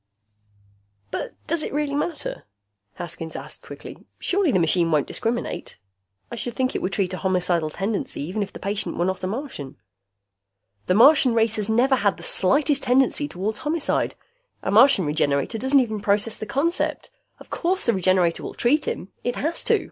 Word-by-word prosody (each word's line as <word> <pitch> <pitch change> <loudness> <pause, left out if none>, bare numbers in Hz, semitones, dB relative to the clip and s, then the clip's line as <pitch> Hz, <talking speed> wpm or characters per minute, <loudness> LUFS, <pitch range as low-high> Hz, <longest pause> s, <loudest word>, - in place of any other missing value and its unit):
"But - - -4
does 335 0 0
it - - -3
really 295 -1 -1
matter?" 300 - -3 0.5
Haskins 165 -2 -6
asked - - -7
quickly. - - -10 0.2
"Surely 375 -4 +1
the 190 - +3
machine 170 0 +3
won't 150 -3 +2
discriminate. 235 +1 -3 0.5
I - - -4
should 235 0 -2
think 260 0 0
it - - -1
would 190 - -2
treat 190 -2 0
a - - -3
homicidal 180 -4 +1
tendency 195 -3 -3
even 185 +8 -3
if 200 - -3
the - - -9
patient 200 +1 -3
were 175 - +1
not 190 0 -2
a - - 0
Martian." 205 - -5 1.1
"The 180 - +3
Martian 255 +1 +6
race 225 -1 +2
has 210 0 -2
never 255 +4 +3
had 200 -3 +1
the - - -11
slightest 280 +8 +2
tendency 265 +3 +2
toward 205 -1 -3
homicide. 305 +1 -1 0.5
A - - -1
Martian 225 - +6
Regenerator 145 - 0
doesn't 265 +3 +4
even 220 -4 -1
process 205 +2 +1
the 215 - -5
concept. 300 +10 -1 0.3
Of - - -15
course 370 +2 0
the 235 - +3
Regenerator 185 -3 +2
will - - -7
treat 280 +5 +2
him. 190 - -3
It 245 0 -1
has 320 +4 -1
to. - - +4
220 Hz, 180 wpm, -23 LUFS, 185-270 Hz, 1.1 s, Martian